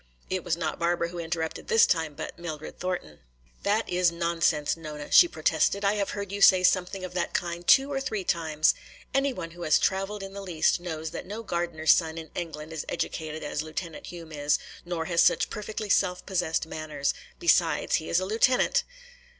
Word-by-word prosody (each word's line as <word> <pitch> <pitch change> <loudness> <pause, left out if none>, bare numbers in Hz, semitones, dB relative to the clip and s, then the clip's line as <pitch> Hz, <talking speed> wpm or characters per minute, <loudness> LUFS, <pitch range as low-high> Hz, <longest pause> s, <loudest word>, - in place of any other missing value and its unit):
It 185 -1 -1
was 170 -1 -1
not 160 -3 -3
Barbara 170 0 +1
who 175 0 -7
interrupted 165 -1 -3
this 225 - +6
time, 160 -4 0
but - - -7
Mildred 155 -3 -7
Thornton. 180 - -4 0.4
"That 210 +3 +1
is 180 -1 +2
nonsense, 170 -3 +1
Nona," 150 -3 -8
she 350 - +8
protested. 165 - +1
"I 200 - +4
have 205 -2 -1
heard 200 -1 -4
you 200 0 -4
say 185 -2 +7
something 185 +1 +2
of 180 - -8
that 180 - -2
kind 175 0 -3
two 275 +1 +6
or 270 - -1
three 215 -7 -3
times. 160 -3 +2 0.4
Anyone 270 -11 0
who 175 +1 -12
has 155 -3 +4
traveled 195 +1 -1
in 195 0 -8
the 200 - -6
least 175 -3 +1
knows 160 -3 -5
that - - -7
no 215 +4 -6
gardener's 170 -5 +1
son 160 -1 +2
in 160 -1 -8
England 160 -2 -6
is 160 - -4
educated 155 -1 -3
as 150 0 -2
Lieutenant 160 +2 -6
Hume 165 -2 -9
is, 145 -1 +1 0.3
nor 170 -2 -3
has 170 0 +2
such - - +3
perfectly 215 0 -5
self 180 -2 +1
possessed 175 -4 0
manners. 155 -3 -2 0.2
Besides, 170 -1 +3
he 160 - -6
is 170 - +3
a 185 - -2
lieutenant." 230 +5 +3
170 Hz, 190 wpm, -27 LUFS, 160-190 Hz, 0.4 s, she